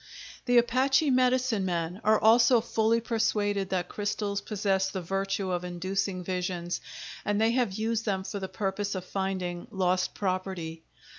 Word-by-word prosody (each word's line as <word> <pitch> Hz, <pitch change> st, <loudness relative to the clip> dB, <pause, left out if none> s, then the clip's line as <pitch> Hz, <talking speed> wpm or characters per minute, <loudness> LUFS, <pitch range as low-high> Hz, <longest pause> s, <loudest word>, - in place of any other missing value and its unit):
The 245 Hz, -1 st, +4 dB
Apache 265 Hz, +5 st, +3 dB
medicine 255 Hz, -4 st, +2 dB
men 175 Hz, +1 st, -2 dB
are 215 Hz, +1 st, +4 dB
also 235 Hz, +2 st, +6 dB
fully 225 Hz, 0 st, +1 dB
persuaded 205 Hz, -4 st, 0 dB
that 180 Hz, -2 st, -1 dB
crystals 205 Hz, 0 st, -2 dB
possess 195 Hz, -2 st, 0 dB
the 190 Hz, -, -4 dB
virtue 195 Hz, +1 st, -2 dB
of 180 Hz, 0 st, -1 dB
inducing 185 Hz, +1 st, -2 dB
visions, 180 Hz, -1 st, -3 dB, 0.4 s
and 205 Hz, 0 st, 0 dB
they 225 Hz, +1 st, +3 dB
have 240 Hz, -5 st, +1 dB
used 225 Hz, +2 st, -1 dB
them 195 Hz, -3 st, -1 dB
for 200 Hz, +1 st, -5 dB
the 190 Hz, -1 st, -5 dB
purpose 200 Hz, 0 st, -2 dB
of 185 Hz, -1 st, -4 dB
finding 185 Hz, -2 st, -3 dB
lost 185 Hz, -1 st, 0 dB
property. 185 Hz, -4 st, -3 dB
195 Hz, 150 wpm, -28 LUFS, 185-225 Hz, 0.4 s, also